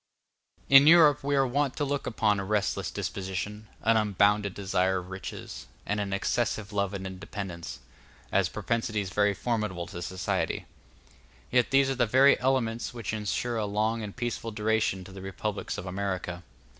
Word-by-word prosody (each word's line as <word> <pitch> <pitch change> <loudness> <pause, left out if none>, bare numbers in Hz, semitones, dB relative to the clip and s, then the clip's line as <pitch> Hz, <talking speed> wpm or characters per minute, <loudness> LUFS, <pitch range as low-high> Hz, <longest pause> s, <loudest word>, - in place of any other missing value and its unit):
In 135 +1 +8
Europe 155 -4 +7
we 140 0 +1
are 135 -1 +4
wont 135 +1 0
to 145 - 0
look 140 0 -2
upon 105 -2 +1
a - - -2
restless 105 +1 0
disposition, 100 +3 -4 0.2
an 115 0 +4
unbounded 100 -1 +2
desire 95 -1 +1
of 90 +1 -7
riches, 95 0 -7 0.2
and 105 +1 -1
an 100 -1 -2
excessive 105 +1 -1
love 100 -1 0
of 95 -1 -5
independence, 95 -2 -6 0.5
as - - +2
propensities 110 -4 -2
very 105 +1 +2
formidable 105 -8 -2
to 85 - -8
society. 90 +1 -2 0.9
Yet 125 -1 +3
these 135 0 +4
are 135 - 0
the 120 - +4
very 130 +5 +5
elements 120 -3 0
which 115 -2 -4
ensure 110 +3 -2
a 105 -2 -1
long 110 +3 0
and 105 -2 -6
peaceful 120 -2 -3
duration 105 -3 0
to 95 - -12
the 95 0 -9
republics 100 +2 -4
of - - -6
America. 95 -2 -3
105 Hz, 165 wpm, -28 LUFS, 95-120 Hz, 0.9 s, In